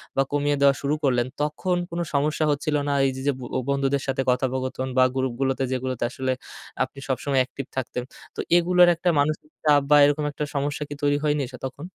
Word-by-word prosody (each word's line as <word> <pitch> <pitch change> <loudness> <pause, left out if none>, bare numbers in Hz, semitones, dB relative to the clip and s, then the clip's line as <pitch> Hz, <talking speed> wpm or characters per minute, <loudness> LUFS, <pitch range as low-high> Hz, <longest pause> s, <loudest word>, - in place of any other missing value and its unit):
বা 135 - +3
কমিয়ে 145 0 +1
দেওয়া 140 -1 +5
শুরু 145 +2 0
করলেন 125 -2 +2
তখন 165 +5 0
কোন 170 +1 -4
সমস্যা 150 +2 +1
হচ্ছিল 150 +1 -1
না? 145 - +1
এই 135 - +2
যে, 130 - -6
যে - - +5
ব - - -10 0.3
বন্ধুদের 140 0 +1
সাথে 135 0 0
কথোপকথন 130 +1 -1
বা 130 - +7
গ্রুপগুলোতে 130 +1 -1
যেগুলোতে 130 -1 -2
আসলে 130 0 -2 0.5
আপনি 135 - -8
সবসময় 135 +1 0
অ্যাকটিভ 130 +1 -5
থাকতেন। 125 -1 -3 0.3
তো - - -9 0.2
এগুলোর 180 +1 +5
একটা 175 +2 0
মানসিক 150 +1 -1
চাপ 145 -2 +5
বা 150 - +7
এরকম 145 +1 +1
একটা 150 - -4
সমস্যা 145 +1 -1
কি 145 - -5
তৈরি 145 0 +3
হয়নি 150 -1 +1
সে - - -7
তখন? 140 +5 -10
140 Hz, 195 wpm, -24 LUFS, 130-150 Hz, 0.5 s, বা